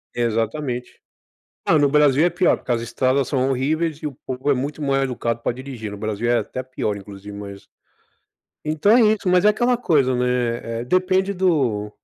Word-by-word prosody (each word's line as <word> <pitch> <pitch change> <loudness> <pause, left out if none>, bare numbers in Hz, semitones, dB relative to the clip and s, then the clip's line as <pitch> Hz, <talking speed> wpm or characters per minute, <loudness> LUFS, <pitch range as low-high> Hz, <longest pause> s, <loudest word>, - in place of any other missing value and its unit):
Exatamente. 120 +2 -2 0.7
Ah, 160 - +4
no 145 -1 +4
Brasil 145 0 +4
é 175 - +3
pior, 175 +2 +2
porque 125 - -3
as 115 -1 0
estradas 130 +2 0
são 130 -2 +1
horríveis 150 +4 0
e - - -3
o 145 - -5
povo 130 +2 -2
é - - +4
muito 145 +4 -4
mal-educado 135 -4 -1
para - - -1
dirigir. 125 -4 -7
No 105 - -7
Brasil 110 +2 -3
é 120 - +3
até 130 - -4
pior, 125 -5 -3
inclusive, 100 0 -10
mas 100 -1 -9 1.0
então 155 +9 +3
é - - +5
isso, 210 - -11
mas 180 +1 +4
é - - +8
aquela 240 +4 +2
coisa, 140 - +2
né, 120 -2 -1
eh, - - -4
depende 185 +6 +1
do 140 - 0
130 Hz, 185 wpm, -21 LUFS, 115-155 Hz, 1.0 s, é